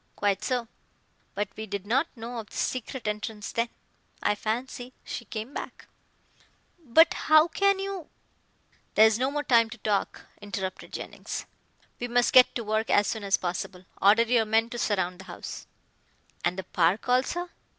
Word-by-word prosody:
"Quite 200 -1 0
so: 245 -2 -1 0.7
But 205 0 -1
we 220 0 -6
did 200 -1 -4
not 265 +9 +2
know 235 +1 -6
of 215 - -8
this - - -9
secret 255 -1 -3
entrance 210 0 -3
then. 230 +1 0 0.5
I - - +3
fancy 245 +4 -4
she 235 - -6
came 220 +5 -6
back - - -7 0.5
" - - -35 0.2
"But 325 +1 +8
how 310 +1 +5
can 395 +2 +2
you 390 -3 -5 0.4
" - - -38
"There's 220 +1 +6
no 260 +1 +2
more 295 +1 -2
time 230 -4 +4
to 240 - -9
talk," 205 -2 -1 0.2
interrupted 190 -2 -5
Jennings. - - -6 0.5
"We 245 - -2
must 245 0 +2
get 255 -1 +7
to 235 - -2
work 220 +1 -1
as 205 - +4
soon 220 0 -3
as 195 -1 +3
possible. 180 +1 -4 0.2
Order 210 +4 +6
your 235 -1 +2
men 225 +2 +2
to 240 - -4
surround 185 -5 0
the 190 - -10
house." 175 -1 -8 0.8
"And 175 +2 0
the 190 - -3
park 180 +4 +1
also?" 305 +8 +1
225 Hz, 170 wpm, -27 LUFS, 205-250 Hz, 0.8 s, But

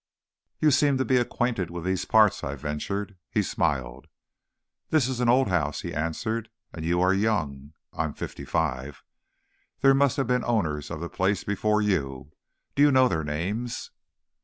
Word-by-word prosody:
"You 155 - +4
seem 140 0 +3
to 130 - 0
be 130 - +3
acquainted 120 -5 0
with 85 0 -6
these 95 0 -1
parts," 110 -1 +4
I 70 - -3
ventured. 85 +8 -4
He - - +1
smiled. 65 -4 -2 0.8
"This 155 -6 +3
is 130 -2 -3
an 120 -1 +2
old 130 +1 +4
house," 75 -5 0
he - - -5
answered, 110 +9 -2 0.2
"and 80 - -6
you 85 +2 +1
are 90 +1 +4
young." 80 -9 -1 0.2
(I - - -1
am 75 - -4
fifty - - -6
five.) 70 -3 -2 0.8
"There 135 0 +6
must 135 -1 +2
have 135 - +1
been 125 +1 +1
owners 80 -11 -1
of 85 -2 -5
the 85 - -3
place 95 +4 0
before 105 +1 +1
you. 70 -8 -1 0.4
Do 140 - 0
you 145 0 +7
know 130 -1 +5
their 80 -6 -1
names?" 95 +11 -3
95 Hz, 175 wpm, -26 LUFS, 75-120 Hz, 0.8 s, you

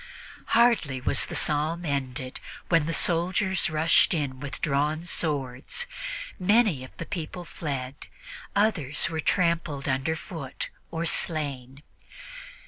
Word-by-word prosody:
Hardly 230 - +3
was 125 - +2
the - - -5
Psalm 155 +3 +1
ended 130 -3 -3 0.3
when 165 -3 +3
the - - 0
soldiers 180 +3 +2
rushed 160 +3 +4
in 140 -4 -2
with 140 0 -6
drawn 150 +2 0
swords. 145 - -1 0.5
Many 200 - +3
of 130 - -9
the 170 - -5
people 175 0 -5
fled; 140 -5 -5 0.5
others 180 -7 +1
were 160 - -2
trampled 165 -5 +1
underfoot 145 +1 -3 0.2
or 165 0 -3
slain. 140 -5 -2
155 Hz, 115 wpm, -27 LUFS, 140-170 Hz, 0.5 s, rushed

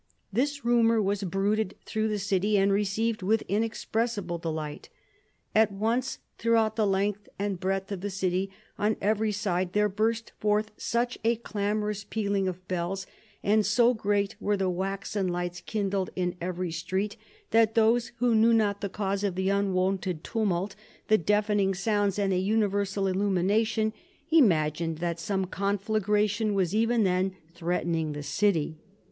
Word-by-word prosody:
This 285 +4 0
rumour 230 -1 +4
was 200 0 0
bruited 195 +2 0
through 220 0 -1
the 210 -1 -1
city, 200 +1 +1
and 195 0 +3
received 210 +2 0
with 215 +4 +1
inexpressible 215 -2 -1
delight. 155 -2 -5 0.6
At 220 -1 +4
once 230 +6 -1 0.2
throughout 225 -2 +2
the 215 -2 +2
length 200 +1 0
and 200 -2 -2
breadth 195 +1 -2
of 195 -3 -4
the 205 - -2
city 190 0 -1 0.3
on 210 +1 +1
every 215 +1 +1
side 185 -3 -1
there 210 0 +3
burst 225 +3 -1
forth 210 +1 +1
such 240 +3 -1
a 230 +1 +3
clamorous 210 -2 -2
pealing 200 -3 -1
of 185 0 -5
bells, 185 +2 -2 0.4
and 215 +1 +3
so 235 +4 +4
great 205 -1 0
were 205 0 +1
the 190 -1 0
waxen 195 +2 -2
lights 175 0 -3
kindled 200 -2 -1
in 180 -1 -1
every 180 0 -3
street, 190 +5 -2 0.4
that 225 0 +4
those 230 +1 +3
who 245 0 +2
knew 225 +1 +5
not 205 -2 +1
the 200 - -2
cause 200 0 -2
of 195 -3 0
the 190 +1 0
unwonted 190 -3 0
tumult, 200 -4 -1 0.3
the 215 - +6
deafening 205 +1 +2
sounds, 205 0 +1
and 200 -1 +1
the 185 - +2
universal 200 -1 +1
illumination, 205 +3 +1 0.4
imagined 165 - +3
that 170 0 -2
some 190 0 -1
conflagration 205 +2 0
was 185 -2 +1
even 225 +1 +3
then 185 0 +1 0.2
threatening 170 -2 -1
the 145 0 -6
city. 160 -2 0
200 Hz, 150 wpm, -28 LUFS, 185-215 Hz, 0.6 s, the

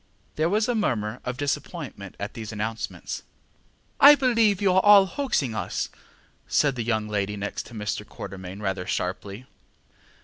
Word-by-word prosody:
ŌĆØ - - -39
There 155 +2 +1
was 215 +4 +2
a 245 - +1
murmur 120 - -1
of 125 0 -4
disappointment 145 - -4
at 100 +2 -4
these 110 -2 -6
announcements. 110 -2 -4 0.8
ŌĆ£I 290 +1 +10
believe 230 -7 +3
you 195 -3 +3
are 190 - +5
all 205 -1 +8
hoaxing 185 - -1
us, 110 - -2
ŌĆØ - - -25 0.5
said 140 -3 +3
the 120 - -2
young 110 -2 0
lady 105 -1 -2
next 105 +3 -5
Mr. 105 -1 -3
Quatermain, 95 0 -8
rather 95 -2 -2
sharply. 100 +5 -3
115 Hz, 160 wpm, -25 LUFS, -, 0.8 s, ŌĆ£I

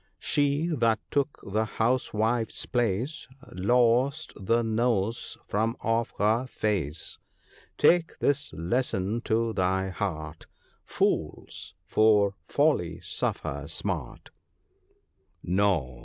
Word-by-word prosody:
She 145 +2 +1
that 115 -8 +2
took 140 0 -1
the 105 +3 0
House 115 +3 0
wife's 110 +1 0
place 120 - -1 0.2
Lost 125 +8 +2
the 115 +4 +1
nose 115 0 0
from 110 +3 0
off 115 +1 0
her 110 +5 +2
face. 85 - -2 0.6
Take 170 -1 +4
this 145 0 0
lesson 100 +3 -1
to 115 0 +1
thy 95 0 +1
heart 80 -5 -4 0.2
— - - -39
Fools - - -1
for 105 -2 +4
folly 90 - +1
suffer 80 -3 -3
smart." 80 - -4 0.6
' - - -44
No! 90 -10 +1
110 Hz, 105 wpm, -27 LUFS, 95-125 Hz, 0.6 s, Take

